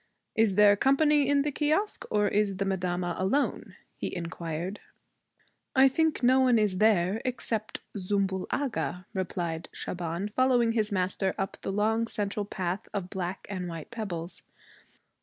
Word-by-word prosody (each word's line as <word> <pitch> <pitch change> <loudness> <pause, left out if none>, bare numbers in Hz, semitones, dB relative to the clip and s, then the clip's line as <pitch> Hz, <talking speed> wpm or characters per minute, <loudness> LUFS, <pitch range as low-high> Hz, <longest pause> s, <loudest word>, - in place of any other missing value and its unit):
'Is 220 -3 +3
there 205 0 +7
company 285 +4 +3
in 285 -1 +3
the 295 - -1
kiosque 315 +9 0
or 210 -1 +2
is 200 -2 +1
madama 180 -2 -1
alone?' 265 +10 0 0.2
he - - -4
inquired. 170 +2 -4 1.0
'I 265 +1 +7
think 320 +1 +1
no 255 +2 +5
one 255 -3 +5
is 205 -4 +1
there 210 -1 +3
except 225 -3 -3
Zümbül 195 -1 -1
Agha,' 250 -9 -2
replied 175 -3 -3
Shaban, 175 +3 -4
following 245 0 +3
his 220 -2 0
master 190 0 0
up 195 0 -3
the - - -3
long 220 +3 +1
central 205 -1 -2
path 185 -1 -3
of 185 -2 -3
black 185 -1 -4
and 185 -3 -4
white 165 +3 -7
pebbles. 185 -7 -4
205 Hz, 140 wpm, -28 LUFS, 185-235 Hz, 1.0 s, there